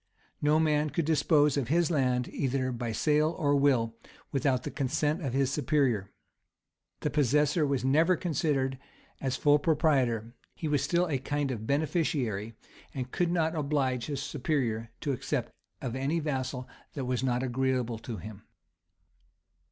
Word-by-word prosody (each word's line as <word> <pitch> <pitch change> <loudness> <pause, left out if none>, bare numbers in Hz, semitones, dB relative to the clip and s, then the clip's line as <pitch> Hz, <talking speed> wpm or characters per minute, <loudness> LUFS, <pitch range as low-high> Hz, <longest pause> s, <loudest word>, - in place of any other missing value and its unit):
[] - - -39
No 150 +1 +4
man 150 -1 +2
could 165 +1 -1
dispose 150 -2 +3
of 135 -5 0
his 170 +4 +2
land, 125 -5 +1
either 130 -1 -1
by 120 -1 -3
sale 150 +7 +2
or 145 -4 +2
will, 130 -5 +3 0.4
without 135 -2 +1
the - - -4
consent 150 +4 0
of 135 -4 -2
his 135 0 +1
superior. 135 -9 +1 0.9
The 150 - -1
possessor 150 +2 +2
was 135 -2 0
never 160 +7 +4
considered 140 -5 -1 0.4
as 135 -2 -1
full 145 0 +4
proprietor; 135 -8 +1 0.2
he 160 - -4
was 145 -3 +1
still 170 +5 +2
a 140 -5 -1
kind 145 +1 -1
of 110 -3 -5
beneficiary; 140 - 0 0.4
and 130 -1 -4
could 175 -1 +1
not 165 -2 +1
oblige 140 -6 0
his 140 -2 -3
superior 125 -7 -1
to 145 - -1
accept 130 - -2 0.3
of 125 -2 -3
any 135 +5 0
vassal 130 -4 -3 0.3
that 135 -3 -3
was 125 -1 -1
not 125 -1 +1
agreeable 125 -2 0
to 115 -1 -6
him. 105 +2 -9
140 Hz, 155 wpm, -29 LUFS, 125-150 Hz, 0.9 s, No